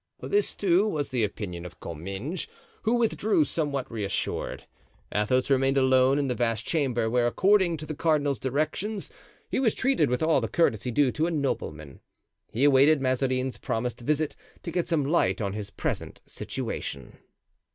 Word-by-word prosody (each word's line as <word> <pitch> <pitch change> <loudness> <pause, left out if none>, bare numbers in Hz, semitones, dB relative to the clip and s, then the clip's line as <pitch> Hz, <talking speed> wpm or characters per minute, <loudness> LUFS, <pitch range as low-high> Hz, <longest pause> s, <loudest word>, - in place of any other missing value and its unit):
This, 410 +1 +1
too, 195 +1 +3
was 150 -8 -2
the 125 -4 0
opinion 90 -4 -4
of 90 -1 -10
Comminges, 95 - -5 0.3
who 230 +2 +2
withdrew 220 -7 +2
somewhat 140 -5 -2
reassured. 105 -3 -3 0.5
Athos 125 +6 +1
remained 135 0 +3
alone 130 0 +4
in 145 -1 0
the 125 - 0
vast 115 -2 -1
chamber, 130 -8 0
where, 120 +1 +2
according 185 - +3
to 155 - -7
the 155 - -4
cardinal's 145 -4 +1
directions, 155 - -2 0.4
he - - +1
was 235 -5 +2
treated 265 - +2
with 125 +4 0
all 160 -4 +3
the 115 - -1
courtesy 125 -7 +1
due 130 +2 +3
to 155 +5 0
a - - -2
nobleman. 75 - -3 0.5
He 120 - -1
awaited 145 +2 +6
Mazarin's 130 0 0
promised 120 +2 -2
visit 150 +4 0 0.3
to 170 - -4
get 175 0 -1
some 160 -5 +1
light 165 +5 +2
on 100 -3 -2
his 105 -1 -5
present - - -4
situation. 70 -2 -6
135 Hz, 160 wpm, -27 LUFS, 120-160 Hz, 0.5 s, awaited